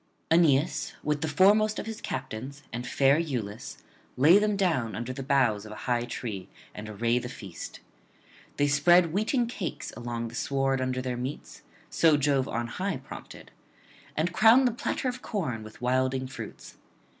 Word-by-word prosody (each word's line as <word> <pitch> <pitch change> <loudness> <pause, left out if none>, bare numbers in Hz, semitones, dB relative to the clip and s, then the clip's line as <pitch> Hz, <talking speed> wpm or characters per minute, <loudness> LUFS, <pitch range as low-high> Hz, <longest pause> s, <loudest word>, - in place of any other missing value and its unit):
Aeneas, 160 -2 +3
with 150 -1 0
the 160 - 0
foremost 205 +7 +4
of - - -4
his 225 -1 -6
captains 130 +2 -5
and 120 +1 -4
fair 135 +1 +4
Iülus, 120 -10 -4 0.4
lay 160 +10 +7
them 210 -1 +1
down 160 - 0
under 120 +3 -4
the 135 - -6
boughs 130 -7 +2
of 110 - -10
a - - -7
high 120 -1 +1
tree 110 -5 -5 0.2
and 105 +1 -8
array 115 +3 +1
the 125 - -6
feast. 100 -8 -9 0.8
They 145 - +3
spread 165 +4 +4
wheaten 225 +5 +1
cakes 225 -7 -5
along 120 -1 -4
the - - -13
sward 135 +1 0
under 130 0 -1
their 125 -1 -2
meats 130 +4 -6 0.3
so 160 -3 +4
Jove 140 -2 +1
on 120 +1 -2
high 185 +9 -3
prompted 130 - -11 0.7
and 165 +3 0
crown 225 +7 +6
the 245 - +3
platter 245 +2 -2
of 250 0 -3
corn 155 - -3
with 110 +2 -12
wilding 130 +1 +1
fruits. 130 - -9
135 Hz, 165 wpm, -28 LUFS, 120-170 Hz, 0.8 s, lay